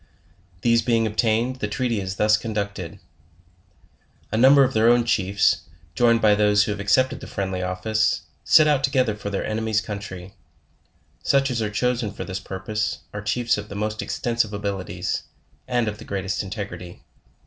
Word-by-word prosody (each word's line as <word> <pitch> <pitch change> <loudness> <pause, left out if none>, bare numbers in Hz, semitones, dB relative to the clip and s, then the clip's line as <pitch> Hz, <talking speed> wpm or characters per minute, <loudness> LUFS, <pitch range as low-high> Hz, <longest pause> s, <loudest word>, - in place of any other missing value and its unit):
These 115 -1 +3
being 115 -1 +1
obtained, 115 +3 0
the 105 - -2
treaty 115 0 -1
is 95 0 -4
thus 105 +1 +4
conducted: 100 -5 -4 1.3
A - - -1
number 135 +4 +7
of 130 0 0
their 110 +1 +4
own 120 0 +4
chiefs, 95 -5 +2 0.3
joined 115 -2 +3
by 105 -1 +6
those 105 0 +4
who 105 - -2
have 100 - -4
accepted 130 +7 +2
the - - -9
friendly 95 -2 -3
office, 95 +4 0 0.2
set 155 - +6
out 145 -3 +2
together 130 -5 +1
for 100 -1 -6
their 100 - -2
enemies 110 0 0
country; 100 -4 -7 0.9
such 135 -1 +2
as 120 -2 -1
are 105 - -1
chosen 120 0 -1
for 105 - -6
this 95 0 -5
purpose, 105 +3 -3
are 105 - -5
chiefs 115 +2 0
of 105 - -9
the 100 - -7
most 105 +1 -2
extensive 120 -4 -1
abilities, 100 -2 -3 0.5
and 120 -3 0
of 105 0 -4
the - - -9
greatest 95 0 -3
integrity. 95 -3 -7
105 Hz, 170 wpm, -23 LUFS, 100-120 Hz, 1.3 s, number